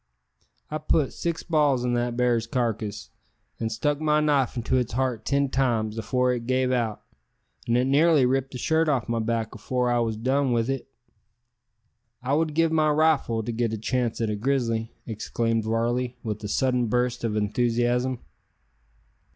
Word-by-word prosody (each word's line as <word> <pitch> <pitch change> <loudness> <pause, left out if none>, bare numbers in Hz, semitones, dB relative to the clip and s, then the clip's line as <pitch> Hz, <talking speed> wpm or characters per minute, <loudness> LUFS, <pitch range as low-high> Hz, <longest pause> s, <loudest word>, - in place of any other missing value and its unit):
I 155 - -2
put 155 -2 +1
six 170 -1 -3
balls 145 -6 +2
in 120 - 0
that 120 0 -1
bar's 120 -2 +1
carcass, 110 - -2 0.5
and 110 -1 -2
stuck 145 +6 -1
my 150 -1 +3
knife 145 -5 +1
into 120 +2 0
its 125 -3 -1
heart 125 -3 -1
ten 140 0 +2
times, 115 -5 0
afore 125 +3 +1
it 120 -1 -5
gave 130 0 +1
out; 115 -4 -1 0.6
an' 120 +1 +2
it 125 - +2
nearly 145 +1 +4
ripped 135 +1 0
the - - -4
shirt 160 +4 +1
off 130 -6 0
my 115 0 -1
back 115 -1 -2
afore 125 -1 -1
I 120 - +2
wos 115 -2 0
done 130 +3 +1
with 115 +2 +1
it." 135 - -4 1.4
"I 130 +2 0
would 155 0 +1
give 165 0 +3
my 155 -1 +3
rifle 150 -7 +2
to 120 - -3
get 115 -1 -1
a - - -2
chance 120 +1 -1
at 115 -2 0
a - - -1
grizzly!" 115 -1 -1
exclaimed 115 0 -1
Varley, 120 +2 -1
with 110 -1 -4
a - - -3
sudden 125 +2 +1
burst 125 +1 0
of 110 -2 -1
enthusiasm. 120 +3 0
125 Hz, 175 wpm, -25 LUFS, 115-135 Hz, 1.4 s, nearly